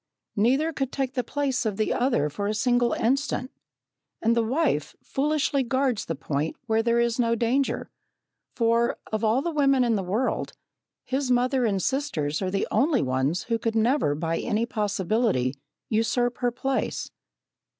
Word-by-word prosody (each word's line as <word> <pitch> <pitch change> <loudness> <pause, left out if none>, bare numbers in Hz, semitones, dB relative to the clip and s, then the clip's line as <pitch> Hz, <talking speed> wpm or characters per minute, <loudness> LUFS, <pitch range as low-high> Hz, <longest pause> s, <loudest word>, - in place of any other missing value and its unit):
Neither 270 +10 +2
could 270 -2 -2
take 265 -2 -2
the 250 - -1
place 280 -2 -1
of 210 -4 -2
the 215 - +1
other 245 - +1
for 185 +8 -3
a 215 - -1
single 245 +1 +2
instant, 260 +2 0 0.7
and 230 +1 +2
the 235 - +3
wife 230 - 0
foolishly 285 0 0
guards 260 -2 0
the 165 - -3
point 145 +2 -2
where 225 -1 +2
there 235 +1 +2
is 235 0 +1
no 230 -1 +2
danger, 245 +4 0 0.6
for, 235 0 +2 0.2
of 215 +1 -1
all 225 +5 +2
the 340 - -1
women 275 -4 +3
in 235 -2 +2
the 205 - +1
world, 205 +8 -1 0.5
his 265 0 -1
mother 250 +1 +2
and 195 -4 0
sisters 170 - -1
are 190 - -1
the 195 +1 -1
only 285 -2 +2
ones 130 +6 0
who 230 -1 -1
could 225 0 -2
never 225 - +2
by 165 +2 -1
any 220 +2 0
possibility 210 - 0 0.3
usurp 240 +2 0
her 245 - +2
place. 260 +2 -2
235 Hz, 165 wpm, -26 LUFS, 210-265 Hz, 0.7 s, the